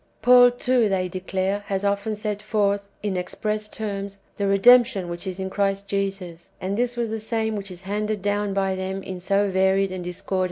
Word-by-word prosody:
""^ -, -, -39 dB
Paul, 245 Hz, +1 st, +8 dB
too, 245 Hz, -2 st, +1 dB
they 185 Hz, -2 st, 0 dB
declare, 190 Hz, +2 st, -2 dB
has 195 Hz, 0 st, -1 dB
often 200 Hz, +2 st, 0 dB
set 210 Hz, -1 st, -3 dB
forth, 205 Hz, -2 st, 0 dB
in 205 Hz, -3 st, -1 dB
express 210 Hz, +4 st, -2 dB
terms, 200 Hz, -2 st, -5 dB, 0.2 s
the 200 Hz, -, 0 dB
re 195 Hz, 0 st, +3 dB
demption 235 Hz, -4 st, +5 dB
which 175 Hz, +3 st, -5 dB
is 185 Hz, 0 st, -5 dB
in 190 Hz, 0 st, -4 dB
Christ 200 Hz, 0 st, 0 dB
Jesus; 195 Hz, -4 st, -3 dB
and 190 Hz, +2 st, -2 dB
this 245 Hz, +2 st, -1 dB
was 235 Hz, -2 st, -1 dB
the 225 Hz, -, -2 dB
same 220 Hz, 0 st, -1 dB
whicli 200 Hz, -1 st, -5 dB
is 180 Hz, -, -10 dB
handed 210 Hz, +1 st, -2 dB
down 205 Hz, 0 st, 0 dB
by 195 Hz, -1 st, +1 dB
them 190 Hz, +1 st, -4 dB
in 185 Hz, -1 st, -6 dB
so 200 Hz, +2 st, +1 dB
varied 190 Hz, +1 st, +2 dB
and 185 Hz, -1 st, -5 dB
discordant 180 Hz, 0 st, -7 dB
forms. 190 Hz, -, +1 dB
200 Hz, 210 wpm, -24 LUFS, 190-215 Hz, 0.2 s, Paul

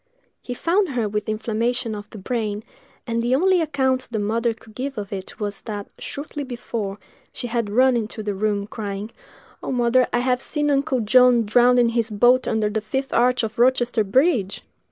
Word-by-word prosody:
He 245 Hz, -, -6 dB
found 360 Hz, +7 st, +1 dB
her 240 Hz, -5 st, -1 dB
with 210 Hz, +1 st, -3 dB
inflammation 225 Hz, +2 st, -1 dB
of 205 Hz, 0 st, -8 dB
the -, -, -10 dB
brain, 215 Hz, 0 st, -3 dB, 0.4 s
and 230 Hz, -2 st, -1 dB
the 240 Hz, +2 st, +2 dB
only 365 Hz, +4 st, +3 dB
account 265 Hz, -4 st, 0 dB
the 230 Hz, -, -3 dB
mother 225 Hz, +3 st, 0 dB
could 220 Hz, -1 st, -18 dB
give 270 Hz, +3 st, -5 dB
of 205 Hz, -1 st, -5 dB
it 190 Hz, -1 st, -7 dB
was, 205 Hz, -2 st, -4 dB
that 205 Hz, -2 st, -6 dB
shortly 290 Hz, 0 st, -6 dB
before, 235 Hz, -5 st, -5 dB, 0.3 s
she -, -, -6 dB
had 235 Hz, -3 st, -1 dB
run 255 Hz, +4 st, +4 dB
into 220 Hz, -1 st, -3 dB
the 205 Hz, -1 st, -2 dB
room, 200 Hz, 0 st, -1 dB
crying, 205 Hz, 0 st, -5 dB, 0.5 s
"Oh, -, -, -4 dB
mother, 245 Hz, 0 st, +3 dB
I -, -, +1 dB
have 250 Hz, +1 st, +1 dB
seen 295 Hz, 0 st, 0 dB
Uncle 275 Hz, -2 st, +1 dB
John 250 Hz, +2 st, +5 dB
drowned 245 Hz, +4 st, +4 dB
in 240 Hz, -1 st, +4 dB
his 230 Hz, -1 st, 0 dB
boat 245 Hz, +4 st, +3 dB
under 220 Hz, -1 st, +1 dB
the 215 Hz, +1 st, -2 dB
fifth 265 Hz, +6 st, -3 dB
arch 250 Hz, 0 st, +3 dB
of 220 Hz, 0 st, -4 dB
Rochester 240 Hz, -2 st, +3 dB
bridge!" 210 Hz, -, +1 dB
235 Hz, 190 wpm, -22 LUFS, 215-255 Hz, 0.5 s, John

